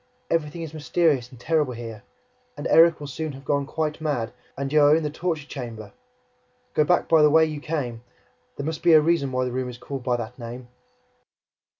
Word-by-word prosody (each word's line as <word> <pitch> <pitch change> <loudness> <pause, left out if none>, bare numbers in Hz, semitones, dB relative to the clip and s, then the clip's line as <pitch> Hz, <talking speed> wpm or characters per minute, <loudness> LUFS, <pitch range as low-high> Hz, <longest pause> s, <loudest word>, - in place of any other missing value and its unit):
Everything 165 0 -1
is 160 -1 -7
mysterious 150 -4 +1
and 125 - -15
terrible 150 -2 +1
here, 115 -3 -8 0.6
and 145 - -6
Erik 165 0 +6
will 145 - -7
soon 150 +2 -4
have 135 +1 -12
gone 140 0 0
quite 155 0 -2
mad, 130 -7 -2 0.2
and 140 +1 -3
you 155 - +6
are 145 +1 +6
in 160 - 0
the 150 - -2
torture 160 -2 -2
chamber!... 120 -7 -8 0.8
Go 150 - +4
back 175 +4 +2
by 160 -2 +5
the 150 - +6
way 160 +2 +5
you 155 -2 -4
came. 130 -8 -3 0.5
There 140 - -5
must 160 0 -3
be 170 - +5
a 155 - +9
reason 155 -3 +1
why 130 0 0
the 125 - -3
room 130 0 -2
is 120 - -8
called 135 +1 -6
by 125 -1 +1
that 120 +2 -7
name!" 120 +1 -8
145 Hz, 210 wpm, -24 LUFS, 125-160 Hz, 0.8 s, a